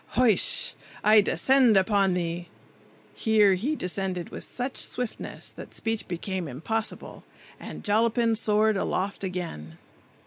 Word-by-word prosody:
Hoish! 250 Hz, -, +3 dB, 0.3 s
I 215 Hz, 0 st, +7 dB
descend 255 Hz, +1 st, +4 dB
upon 195 Hz, -1 st, +2 dB
the—" 170 Hz, 0 st, -3 dB, 0.7 s
Here 215 Hz, -3 st, +4 dB
he 245 Hz, +12 st, -1 dB
descended 180 Hz, -, -3 dB
with -, -, -7 dB
such 255 Hz, +2 st, -4 dB
swiftness 245 Hz, -3 st, -4 dB
that -, -, -10 dB
speech 225 Hz, -1 st, -3 dB
became 180 Hz, 0 st, -4 dB
impossible, 210 Hz, -, -4 dB, 0.4 s
and -, -, -9 dB
Jollapin 230 Hz, +2 st, +2 dB
soared 215 Hz, -1 st, +2 dB
aloft 195 Hz, +1 st, -2 dB
again. 170 Hz, -, -5 dB
205 Hz, 115 wpm, -26 LUFS, 180-225 Hz, 0.7 s, I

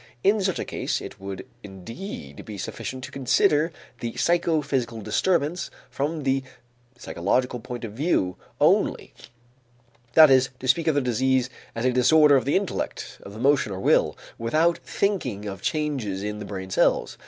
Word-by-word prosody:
In 205 Hz, +1 st, +4 dB
such 190 Hz, -2 st, 0 dB
a -, -, -3 dB
case -, -, -2 dB
it -, -, -9 dB
would 95 Hz, -1 st, -6 dB, 0.2 s
indeed 95 Hz, -, -8 dB
be 105 Hz, -2 st, -8 dB
sufficient 130 Hz, +6 st, -5 dB
to -, -, -7 dB
consider 145 Hz, +4 st, +2 dB, 0.3 s
the 115 Hz, -1 st, -4 dB
psychophysical 145 Hz, -9 st, +1 dB
disturbance 155 Hz, -, 0 dB, 0.2 s
from 145 Hz, +4 st, -2 dB
the 135 Hz, 0 st, +1 dB, 0.6 s
psychological 125 Hz, +7 st, -1 dB
point 120 Hz, +2 st, -7 dB
of 105 Hz, -, -8 dB
view 115 Hz, -, 0 dB, 0.2 s
only, -, -, +2 dB, 1.0 s
that 155 Hz, -1 st, +8 dB
is, 130 Hz, -1 st, +5 dB
to 130 Hz, -, -6 dB
speak 145 Hz, +7 st, +2 dB
of 155 Hz, -, +3 dB
the 145 Hz, -, +3 dB
disease 130 Hz, +1 st, +1 dB, 0.2 s
as 115 Hz, +2 st, -2 dB
a 130 Hz, -, +3 dB
disorder 145 Hz, +4 st, +6 dB
of 135 Hz, +1 st, +1 dB
intellect, 190 Hz, +5 st, -2 dB
of 100 Hz, -, -11 dB
emotion 135 Hz, -1 st, +2 dB
or 95 Hz, -, -4 dB
will, -, -, +2 dB, 0.2 s
without 155 Hz, +9 st, +2 dB
thinking 130 Hz, -, -2 dB
of 100 Hz, -2 st, -6 dB
changes 130 Hz, -12 st, -2 dB
in 105 Hz, 0 st, -4 dB
the 105 Hz, -, -6 dB
brain 95 Hz, -2 st, -6 dB
cells. -, -, +2 dB
130 Hz, 155 wpm, -25 LUFS, 105-150 Hz, 1.0 s, that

